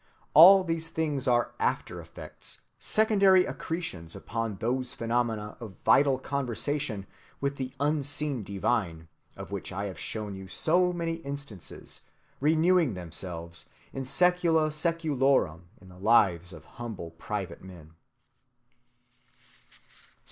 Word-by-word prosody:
All 185 +5 +10
these 165 -2 -2
things 150 -5 -2
are 120 -1 +2
after‐effects, - - -4 0.2
secondary 200 -4 +4
accretions 95 - -4
upon 115 -2 -3
those 125 +5 -1
phenomena 115 -2 -1
of 110 -6 -9
vital 140 -1 +5
conversation 135 -4 -2 0.3
with 140 0 -2
the 130 -1 -5
unseen 145 -2 0
divine, 95 -5 -2 0.3
of - - -8
which 100 -1 -4
I 100 +1 -3
have 95 -2 -6
shown 105 -2 -3
you 95 0 -8
so 180 - +2
many 165 -1 -2
instances, 140 - -7 0.4
renewing 160 - +3
themselves 85 -2 -5 0.2
in 135 - -4
sæcula 170 0 +3
sæculorum 140 - +1
in 95 - -16
the 90 0 -14
lives 95 -5 +3
of 80 -3 -12
humble 110 -9 -7
private 95 +3 -5
men. 85 -4 -12
125 Hz, 110 wpm, -28 LUFS, 95-155 Hz, 0.4 s, All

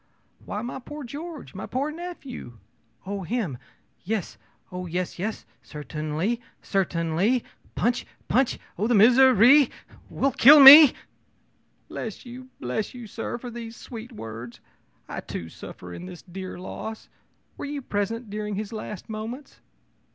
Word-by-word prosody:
ō'Why, 210 +3 -5
my 245 - -5
poor 295 +4 -8
George! 300 +5 -8
my 190 - -6
poor 275 +4 -2
nephew!' 305 - -8 0.5
ō'Oh 200 0 -4
him! 180 - -3 0.4
Yes 210 -1 -3 0.3
oh, 180 0 -5
yes, 180 +1 -3
yes. 210 +4 -4 0.2
Certainly 155 - -3 0.2
certainly. 190 +5 0 0.3
Punch 240 +1 0 0.2
punch 260 0 +2 0.2
oh, 215 - +1
this 240 -2 +3
misery 255 +3 +7 0.4
will 275 - 0
kill 285 +5 +8
me!' 285 +1 +12 0.9
ō'Bless 220 +1 -7
you! 255 +1 -10
bless 125 - -3
you, 245 -2 -8
sir, 225 +2 -5
for 245 0 -8
these 230 -1 -8
sweet 235 0 -9
words! 115 - -8 0.5
I, - - -5
too, 80 - -7
suffer 90 +2 -10
in 180 - -8
this 180 -2 -10
dear 185 +1 -8
loss. 220 +4 -7 0.5
Were - - -6
you 285 -1 -5
present 215 +1 -3
during 210 0 -3
his 215 +2 -5
last 215 -2 -7
moments?' 225 +6 -7
220 Hz, 135 wpm, -25 LUFS, 185-250 Hz, 0.9 s, me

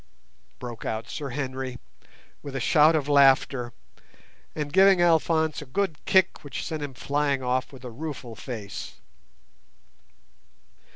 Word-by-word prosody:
broke 120 -3 -8
out 110 +1 -3
Sir 145 -2 -5
Henry, 130 -1 -4 0.6
with 140 -2 -8
a - - -1
shout 155 +5 +5
of 145 -3 0
laughter, 135 -3 +4 0.8
and 150 -2 -4
giving 190 0 +6
Alphonse 160 -2 +2
a - - -8
good 165 +2 -2
kick 190 -1 +3
which 145 -3 -6
sent 155 -1 -4
him 140 -3 -6
flying 140 0 -1
off 125 +1 -1
with 130 -2 -12
a 125 - -6
rueful 135 -3 -7
face. 110 -3 -7
140 Hz, 130 wpm, -26 LUFS, 125-155 Hz, 0.8 s, giving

